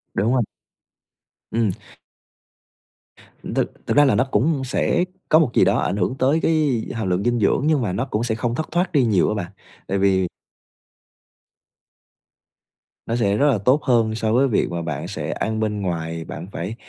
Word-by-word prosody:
Đúng 110 +6 +1
rồi. 125 - +2 1.1
Ừm. 110 -3 +1 1.8
Thực - - 0 0.2
thực - - 0
ra 145 - +7
là 130 - +3
nó 115 - +3
cũng 135 +5 +1
sẽ 130 +6 +1 0.3
có 155 - +6
một 150 -8 +2
gì - - +4
đó - - +3
ảnh 90 - -1
hưởng 100 +7 0
tới 140 +5 +3
cái 150 -8 +1
hàm 110 -5 -2
lượng 90 +2 0
dinh 120 0 +1
dưỡng, 105 +5 +2
nhưng 155 -3 +2
mà 105 -6 -1
nó 115 - -1
cũng 115 -4 -2
sẽ 110 -2 -1
không 120 +1 -2
thất 155 +2 -4
thoát 175 +2 0
đi 140 -4 +3
nhiều 100 -6 +2
á 110 - -1
bạn, 90 -3 -4 0.4
tại 100 - -1
vì 95 -1 +2 2.8
nó 115 - -1
sẽ 105 -3 +1
rất 145 - +3
là 120 - +1
tốt 130 +9 +2
hơn 115 -4 +2
so 110 0 0
với 135 +3 +4
việc 110 - +1
mà 85 - -3
bạn 80 -4 -4
sẽ - - -4
ăn 110 0 -2
bên 105 -1 -1
ngoài, 85 -3 -3
bạn 85 +2 -7
phải 95 +6 -5
110 Hz, 190 wpm, -22 LUFS, 100-130 Hz, 2.8 s, ra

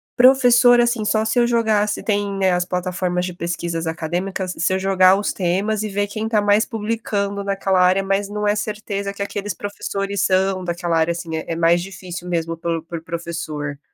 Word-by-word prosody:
Professor, 245 -1 +6
assim, 235 -3 0
só 215 +1 +2
se 220 +2 +1
eu 240 - +3
jogar 220 -3 +2
se 205 - -3
tem, 205 -2 0
né, 190 -1 +2
as 180 0 +1
plataformas 180 0 -2
de 180 - -5
pesquisas 170 -1 -3
acadêmicas, 175 +3 -3
se 180 +3 +1
eu 190 - 0
jogar 190 -1 +5
os 205 - -1
temas 195 +4 0
e - - -2
ver 205 +1 -1
quem 215 +2 -4
tá 215 -2 +2
mais 205 +2 +3
publicando 210 -3 -2
naquela 195 -1 0
área, 185 +2 +4
mas 195 +1 0
não 210 +1 -3
é 205 - +3
certeza 205 -1 -3
que 200 - -9
aqueles 205 -1 -4
professores 200 0 -3
são 190 0 +1
daquela 175 -1 -1
área, 160 +1 +2
assim, 165 -2 -5
é 160 - -5
é 165 - -1
mais 170 +1 +3
difícil 180 -2 -8
mesmo 165 -1 -2
pel 165 -1 -3
por 170 -1 -7
professor. 160 -4 -5
195 Hz, 200 wpm, -20 LUFS, 175-205 Hz, -, Professor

